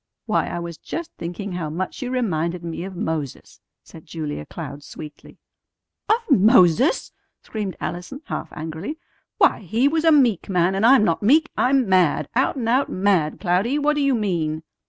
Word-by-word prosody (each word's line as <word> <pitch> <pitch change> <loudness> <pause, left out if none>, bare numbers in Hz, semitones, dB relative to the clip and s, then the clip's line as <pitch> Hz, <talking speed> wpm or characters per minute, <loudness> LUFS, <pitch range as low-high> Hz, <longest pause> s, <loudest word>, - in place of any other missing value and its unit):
"Why, - - 0
I - - -4
was 170 -2 -6
just 335 -1 -6
thinking 175 +4 -5
how 175 -4 -3
much 180 +4 -4
you 250 - -3
reminded 180 -9 -1
me 170 0 -5
of 190 -1 -8
Moses," 160 -6 -5 0.2
said 160 - -15
Julia 150 - -5
Cloud 145 -3 -8
sweetly. 150 0 -11 0.7
"Of 455 -4 +1
Moses!" 220 - +4 0.3
screamed 210 -4 -5
Allison 180 - -6
half - - -5
angrily. 160 - -6 0.4
"Why, - - +4
he 220 +7 +1
was 320 +2 0
a 325 - +5
meek 245 - +3
man, 180 0 +2
and 195 +4 +3
I'm 265 -3 +6
not 165 -5 +1
meek. 305 +9 +3
I'm 260 -2 +2
mad! 175 -6 +2
Out 260 +3 +1
and 245 -4 -3
out 255 +4 +2
mad, 185 -5 +1
Cloudy. 195 +9 +1
What 295 +1 +2
do 295 - 0
you 275 -2 +2
mean?" 165 -7 -1
190 Hz, 175 wpm, -22 LUFS, 165-255 Hz, 0.7 s, I'm